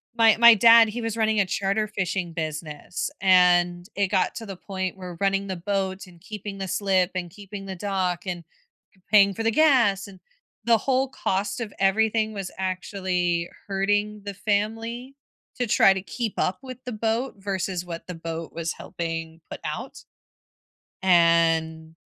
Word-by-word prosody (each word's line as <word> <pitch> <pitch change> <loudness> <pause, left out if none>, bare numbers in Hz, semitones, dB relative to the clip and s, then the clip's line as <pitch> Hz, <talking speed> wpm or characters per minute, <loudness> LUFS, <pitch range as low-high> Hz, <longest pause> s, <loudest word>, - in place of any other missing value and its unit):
my 225 -2 +5
my 235 0 +9
dad, 230 +1 +7
he 235 +3 -5
was 225 0 -3
running 220 -1 +2
a 195 - +3
charter 200 +3 -1
fishing 185 -3 -3
business, 155 0 -4
and 180 -1 +4
it 200 -1 +1
got 190 -2 +1
to 225 - -6
the 195 -2 -7
point 190 0 -4
where 180 -2 -8
running 195 0 +1
the 190 - -3
boat, 190 +1 -2
and 170 -2 -17
keeping 205 -2 -7
the 190 - -3
slip, 190 -1 +1
and 175 -2 -3
keeping 200 0 -9
the 190 -1 -6
dock, 185 -2 -2
and 175 -2 -4 0.5
p 190 - -29
paying 200 -2 +6
for 225 - -5
the 225 - +2
gas, 235 -9 +3
and 190 -2 -14 0.5
the 230 -1 +5
whole 265 +2 +1
cost 200 0 -2
of 215 -3 -5
everything 220 +3 +2
was 195 -3 -5
actually 180 -2 -1 0.2
hurting 205 +2 0
the 200 - -4
family 225 +5 -2 0.4
to 245 - -1
try 195 -2 +5
to 190 - -4
keep 225 +2 -4
up 185 +4 0
with 255 -2 -8
the 250 - -4
boat 225 +4 -1
versus 190 -2 -3
what 170 -1 -7
the 180 - -5
boat 165 0 -6
was 165 -1 -3
helping 165 -1 -6
put - - -7
out, - - -6 1.0
and 165 -2 +3
195 Hz, 170 wpm, -25 LUFS, 180-215 Hz, 1.0 s, my